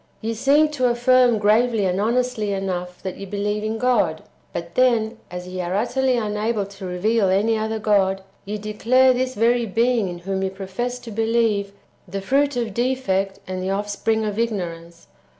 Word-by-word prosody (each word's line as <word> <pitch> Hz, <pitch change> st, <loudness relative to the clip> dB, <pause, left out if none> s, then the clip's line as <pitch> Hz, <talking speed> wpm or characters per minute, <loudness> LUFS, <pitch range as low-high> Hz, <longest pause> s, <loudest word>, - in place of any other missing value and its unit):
Ye 225 Hz, +1 st, -3 dB
seem 285 Hz, +7 st, +3 dB
to 255 Hz, -5 st, +1 dB
affirm 245 Hz, 0 st, +4 dB
gravely 215 Hz, +1 st, +3 dB
and 185 Hz, +1 st, 0 dB
honestly 235 Hz, -1 st, 0 dB
enough 180 Hz, -2 st, -4 dB
that 190 Hz, -1 st, -5 dB
ye 200 Hz, -, -7 dB
believe 205 Hz, +2 st, -2 dB
in 220 Hz, +1 st, -2 dB
God; 225 Hz, -10 st, +1 dB, 0.3 s
but 170 Hz, 0 st, -6 dB
then, 230 Hz, -2 st, +2 dB
as 180 Hz, 0 st, -7 dB
ye 185 Hz, 0 st, -4 dB
are 180 Hz, +1 st, -2 dB
utterly 250 Hz, +4 st, +1 dB
unable 210 Hz, -1 st, -1 dB
to 195 Hz, -1 st, -9 dB
reveal 195 Hz, +3 st, +1 dB
any 205 Hz, +4 st, +2 dB
other 220 Hz, 0 st, -2 dB
God, 195 Hz, -3 st, +1 dB, 0.2 s
ye 210 Hz, +2 st, -4 dB
declare 235 Hz, +5 st, +3 dB
this 255 Hz, +1 st, -2 dB
very 235 Hz, +2 st, +2 dB
Being 230 Hz, 0 st, +1 dB
in 175 Hz, -, -6 dB
whom 190 Hz, +2 st, -3 dB
ye 190 Hz, -, 0 dB
profess 195 Hz, +6 st, -4 dB
to 240 Hz, -2 st, -10 dB
believe, 225 Hz, -2 st, +1 dB, 0.4 s
the 195 Hz, +2 st, -4 dB
fruit 275 Hz, +7 st, +1 dB
of 230 Hz, -4 st, -2 dB
defect 215 Hz, -6 st, -1 dB
and 185 Hz, 0 st, -4 dB
the 185 Hz, -, -2 dB
offspring 205 Hz, +2 st, -1 dB
of 210 Hz, 0 st, -3 dB
ignorance. 170 Hz, -7 st, -4 dB
215 Hz, 175 wpm, -22 LUFS, 195-240 Hz, 0.4 s, affirm